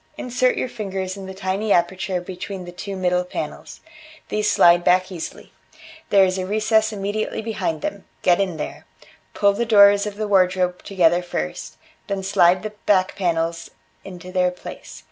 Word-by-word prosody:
Insert 250 0 0
your - - -1
fingers 195 -5 -4
in 195 -1 -8
the 190 - -7
tiny 195 +3 -2
aperture 185 +1 +1
between 185 +1 -7
the 175 - -8
two 195 +3 -6
middle 180 -1 +1
panels. 180 - -7 0.5
These 210 0 0
slide 175 0 +5
back 185 +2 +3
easily: 170 -3 -8 0.6
there 195 -1 +6
is 185 0 -1
a 185 - -2
recess 220 +1 +2
immediately 205 +1 -3
behind 215 -8 -3
them. 200 -1 -4 0.2
Get 180 +2 +4
in 185 -4 -2
there; 150 - -7 0.5
pull 200 -1 +3
the 225 +4 -1
doors 205 -2 +6
of 205 - -6
the 215 0 -3
wardrobe 185 -2 +2
together 175 -3 +2
first, 75 - -5 0.3
then 195 -1 -3
slide 185 -1 +3
the 215 - -4 0.2
back 190 -2 +3
panels 170 -2 -1 0.3
into 180 -1 -10
their 180 -1 +2
place. 180 - -10
190 Hz, 165 wpm, -22 LUFS, 180-205 Hz, 0.6 s, there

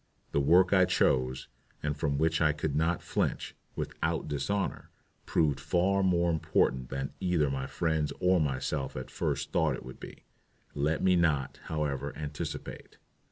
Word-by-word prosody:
The - - +2
work 90 +7 +5
I 95 -2 +6
chose, 65 -7 +1 0.4
and 75 -1 -1
from 70 -1 -1
which 80 +2 +1
I 75 -2 +4
could 75 -1 -2
not 80 +3 +1
flinch - - -1 0.2
without - - -2
dishonor, 95 +8 -2 0.4
proved 75 -4 +2
far 95 +3 +2
more 85 -2 +3
important 65 -5 +1
than 70 +1 -4
either 85 -6 +1
my 65 0 -3
friends 80 -2 0
or 90 -1 +3
myself 70 -1 -2
at 65 - -6
first - - -2
thought 80 -5 +2
it - - -10
would 65 - -10
be. - - -11 0.5
Let 75 +2 0
me 95 -1 +5
not, 75 -6 +1
however, 70 -3 -2
anticipate. 75 -1 -6
75 Hz, 155 wpm, -30 LUFS, 70-85 Hz, 0.5 s, I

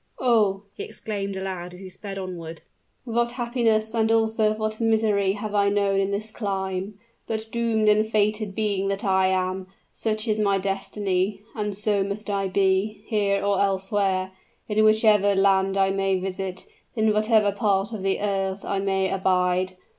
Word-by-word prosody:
"Oh!" 210 -6 +2
he - - -8
exclaimed 200 -2 -5
aloud, 185 -2 -5
as - - -13
he 190 - -9
sped 195 +1 -8
onward, 170 -4 -7 0.4
"what 235 0 0
happiness 235 -3 0
and 225 -1 +2
also 220 -1 +2
what 215 +1 -3
misery 215 -3 +2
have 210 +1 -5
I 200 -1 +3
known 200 -1 +1
in 195 0 +1
this 210 +2 -3
clime. 195 -1 -3 0.3
But, 220 0 -3
doomed 230 -2 +1
and 210 +1 +4
fated 215 -1 0
being 200 -3 0
that 195 0 -2
I 190 -1 +3
am, 185 0 -1 0.2
such 215 0 -2
is 215 -1 +1
my 200 -2 +2
destiny; 195 0 -2
and 210 -2 -3
so 205 -1 +1
must 200 +2 -4
I 195 -1 0
be, 195 +2 +1
here 200 -3 0
or 200 -1 +2
elsewhere, 195 -1 0 0.4
in 215 0 +2
whichever 215 -2 +4
land 195 0 +3
I 195 0 +3
may 195 0 +1
visit, 190 0 -5 0.3
in 220 -1 +2
whatever 215 -1 +3
part 200 +1 0
of 215 - -5
the 195 +1 0
earth 195 -1 -1
I 200 - -1
may 190 -1 +1
abide. 185 -1 +1
200 Hz, 165 wpm, -24 LUFS, 190-215 Hz, 0.4 s, and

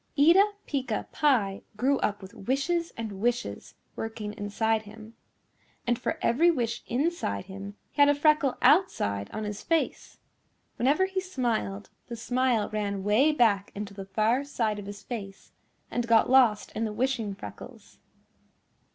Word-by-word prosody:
Eeta 365 +8 +6
Peeca 260 -6 -2
Pie 225 -10 +2 0.2
grew 270 +4 +2
up 205 -1 -1
with 190 - -11
wishes 305 - -1
and 210 -4 -5
wishes 240 +1 -2 0.2
working 220 -2 -5
inside 220 +1 0
him. 215 +1 -12 0.7
And 240 0 +1
for 320 - -2
every 320 +9 +4
wish 240 -8 -1
inside 255 - -1
him 200 +1 -8 0.2
he 290 - 0
had 285 - +7
a 290 - +4
freckle 295 -2 +3
outside 100 - +3
on 215 - -5
his 210 0 -5
face. 330 -1 -1 0.6
Whenever 285 +9 +3
he 380 0 -2
smiled 235 - -2 0.2
the 235 - -5
smile 245 -1 +1
ran 200 -2 -2
way 220 +10 +4
back 220 -8 +2
into 200 0 -6
the 195 -1 -7
far 220 +7 +1
side 225 -7 -1
of 200 - -8
his 205 0 -8
face 195 -5 -7 0.4
and 240 -1 -1
got 230 +1 +4
lost 245 -6 +4
in 225 - -3
the 215 -2 -2
wishing 230 -3 -1
freckles. 105 - -11
230 Hz, 150 wpm, -28 LUFS, 205-275 Hz, 0.7 s, had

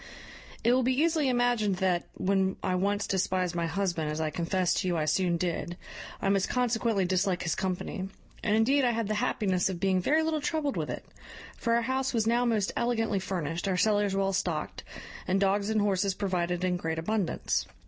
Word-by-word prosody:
"It 240 - +4
will 260 - +3
be 255 +1 +1
easily 315 -3 +2
imagined 245 -5 +2
that, 180 -2 0
when 190 0 +1
I 185 - 0
once 200 +2 0
despised 185 -2 0
my 170 -1 -1
husband, 170 -3 -1
as 150 +1 -3
I 155 -1 -1
confess 180 +2 0
to 185 - -1
you 175 -2 +1
I 155 - 0
soon 175 +2 +1
did, 175 0 -3 0.5
I - - +1
must 195 -1 +2
consequently 230 -5 +1
dislike 185 0 0
his 160 - 0
company; 190 +1 -3 0.3
and 210 - +1
indeed 265 +6 +3
I 240 -1 +3
had 230 -2 -1
the 215 - 0
happiness 195 -3 0
of 180 -3 -4
being 190 -1 +2
very 310 - +2
little 315 -1 0
troubled 300 -2 -1
with - - -2
it; - - -5 0.5
for 230 0 0
our 235 - +2
house 260 +1 -1
was 225 -2 +2
now 240 +2 +2
most 215 -5 +1
elegantly 225 -4 0
furnished, 175 -2 -3
our 185 -2 +1
cellars 205 -1 +2
well 195 0 +1
stocked, 175 -5 -2 0.4
and 190 +1 +2
dogs 200 +1 +1
and 220 -1 +2
horses 195 -1 +1
provided 180 -3 -1
in 180 -1 +1
great 160 -2 -3
abundance. 195 +2 -1
195 Hz, 200 wpm, -29 LUFS, 180-225 Hz, 0.5 s, It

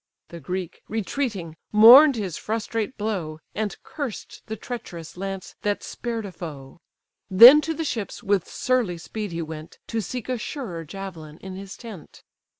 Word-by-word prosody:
The 170 - -9
Greek, 180 +3 -5
retreating, 210 - -3
mourn'd 245 +7 +9
his 195 -7 -3
frustrate 225 +2 -3
blow, 190 -8 -3 0.2
And 210 -2 -2
cursed 280 -8 -6
the 220 - -4
treacherous 175 -10 -7
lance 195 0 -5
that 205 -1 -1
spared 230 -3 -4
a 195 - -6
foe; 150 -4 -9 0.5
Then 240 +10 +10
to 320 +1 -3
the 325 - -2
ships 225 -8 -4
with 200 -3 +1
surly 245 -9 0
speed 210 +4 -6
he 165 0 -3
went, 155 0 -9
To 225 -1 -1
seek 245 +5 -5
a 255 -2 -2
surer 205 - -5
javelin 165 -4 -8
in 190 +1 -8
his 195 0 -8
tent. 215 -9 -11
200 Hz, 155 wpm, -24 LUFS, 170-230 Hz, 0.5 s, Then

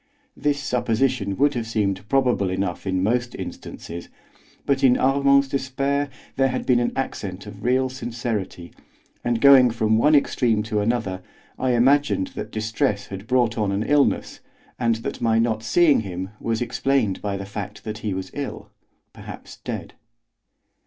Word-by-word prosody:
This 145 -1 0
supposition 120 -6 0
would 145 +1 +3
have 115 -2 -3
seemed 105 -2 -1
probable 125 -8 +2
enough 95 0 -3
in 95 -1 0
most 120 +4 0
instances, 85 +1 -8 0.6
but 140 -1 +1
in 125 -2 +6
Armand's 140 +1 +4
despair 140 +1 -1 0.3
there 135 0 +4
had 130 0 -3
been 125 -2 +4
an 120 - 0
accent 100 -7 -4
of 105 0 -10
real 130 +2 +2
sincerity, 115 -8 -4 0.5
and, 120 -1 0
going 135 -1 +7
from 110 -1 +1
one 150 +5 +5
extreme 120 -6 +2
to 110 -1 -1
another, 105 -4 -1 0.4
I 130 -1 +1
imagined 145 - +3
that - - -7
distress 110 -2 -1
had 95 +2 -8
brought 120 -2 +2
on 105 -2 +1
an 100 +2 0
illness, 145 +2 +1 0.4
and 115 -2 +2
that 140 - -4
my 115 -1 +2
not 115 -1 +1
seeing 155 +5 +4
him 95 -2 -5
was 115 +1 -1
explained 125 -3 0
by 100 -1 -2
the 100 - -6
fact 100 +1 -7
that 110 -1 -5
he 105 -3 -3
was 95 0 -5
ill, 140 -1 -6 0.4
perhaps - - -10
dead. - - -6
115 Hz, 160 wpm, -23 LUFS, 105-135 Hz, 0.6 s, going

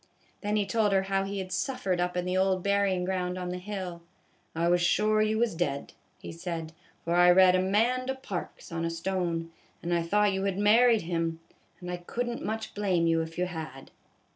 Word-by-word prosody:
Then 210 0 -1
he 210 -1 +1
told 210 0 +1
her 190 0 +3
how 195 0 0
he 200 +1 -4
had 185 -1 -5
suffered 225 -10 -1
up 180 0 -1
in 180 - -1
the 180 0 -1
old 190 -1 +2
burying 200 -2 +1
ground 180 -1 -2
on 180 -1 -4
the 180 0 -4
hill. 185 -3 -6 0.5
"I 165 +1 +1
was 175 0 +3
sure 215 +4 +3
you 215 0 +1
was 235 0 +1
dead," 160 -5 -2 0.2
he - - -8
said, 165 -1 -5
" - - -33
for 170 - 0
I 175 0 +6
read 185 +1 +7
Amanda 230 +8 +1
Parks 200 -12 -7
on 165 0 -3
a 165 - 0
stone, 165 -1 -2 0.3
and 175 +1 -1
I 170 - +2
thought 205 +4 +2
you 190 +1 -1
had 195 -1 -1
married 225 +2 +5
him; 165 -1 -2 0.4
and 180 -1 -6
I 180 - -3
could 235 +8 -4
n't 240 0 -4
much 220 0 -4
blame 190 -5 +1
you 165 0 +3
if 160 0 -7
you 180 - +1
had." 160 -7 -7
185 Hz, 215 wpm, -28 LUFS, 175-205 Hz, 0.5 s, read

